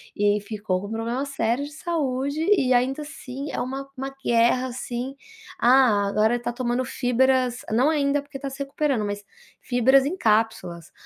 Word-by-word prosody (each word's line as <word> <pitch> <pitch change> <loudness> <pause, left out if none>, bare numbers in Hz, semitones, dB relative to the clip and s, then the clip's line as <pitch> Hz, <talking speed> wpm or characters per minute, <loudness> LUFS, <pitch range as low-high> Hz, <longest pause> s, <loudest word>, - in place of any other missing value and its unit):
E 205 0 +3
aí - - -1
ficou 205 -3 -3
com 200 +3 -7
problema 230 +4 -2
sério 260 -2 -1
de 290 - -9
saúde 285 -3 -2
e, 270 -11 +3
ainda 255 +4 +1
assim, 280 -1 -7
é - - -3
uma 270 +2 -4
uma 270 +1 -5
guerra, 240 +2 +3
assim. 250 +1 -5 0.4
Ah, 240 -5 +5
agora 215 +3 +2
ele 240 - -5
tá 240 - -2
tomando 245 +1 -1
fibras 255 0 +1
não 250 +7 +3
ainda, 290 -2 +1
porque 285 -1 -9
tá 275 0 -5
se 270 - -10
recuperando, 275 -3 -1
mas 205 0 -4 0.4
fibras 260 +2 +4
em 305 +6 -1
cápsulas: 215 - 0
255 Hz, 175 wpm, -24 LUFS, 230-275 Hz, 0.4 s, Ah